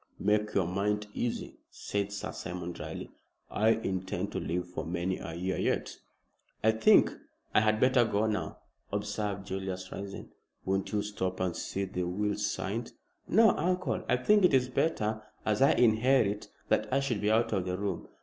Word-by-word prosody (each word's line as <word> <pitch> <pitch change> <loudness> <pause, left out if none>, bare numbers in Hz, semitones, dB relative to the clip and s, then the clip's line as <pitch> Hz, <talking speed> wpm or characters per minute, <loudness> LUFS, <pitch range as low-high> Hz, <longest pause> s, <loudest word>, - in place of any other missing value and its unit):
"Make 105 +1 +1
your 95 - +3
mind 105 +4 0
easy," 120 - -3
said 100 0 -3
Sir 100 - -4
Simon, 90 0 -5
dryly. 85 - -7 0.4
"I 110 +1 +3
intend 95 -3 -1
to - - -2
live 90 +1 -2
for 90 - -5
many 85 +2 -2
a 80 - -6
year 90 +2 -2
yet." - - -1 0.7
"I 110 - +6
think 110 0 +5 0.4
I - - +6
had 110 0 +2
better 130 0 +5
go 110 -1 +1
now," 110 -1 -2 0.3
observed 100 -1 -2
Julius, 95 -1 -4
rising. 100 0 -7 0.3
"Won't 95 0 -1
you 105 -1 0
stop 95 -3 -3
and 90 -2 -1
see 100 0 -3
the 90 -1 -3
will 105 +3 0
signed?" 105 +2 -3 0.3
"No, 220 +3 +6
uncle. 180 +3 -1
I 125 - +4
think 205 +10 +4
it 180 -6 +6
is 125 -1 +2
better, 110 -7 0 0.2
as 105 +1 +1
I 135 - +6
inherit, 115 -2 +3 0.2
that - - +1
I 135 - +3
should 135 -6 -1
be 105 - +2
out 110 +1 +2
of 95 -3 0
the 90 0 -2
room. 100 -3 -3
105 Hz, 175 wpm, -30 LUFS, 95-110 Hz, 0.7 s, I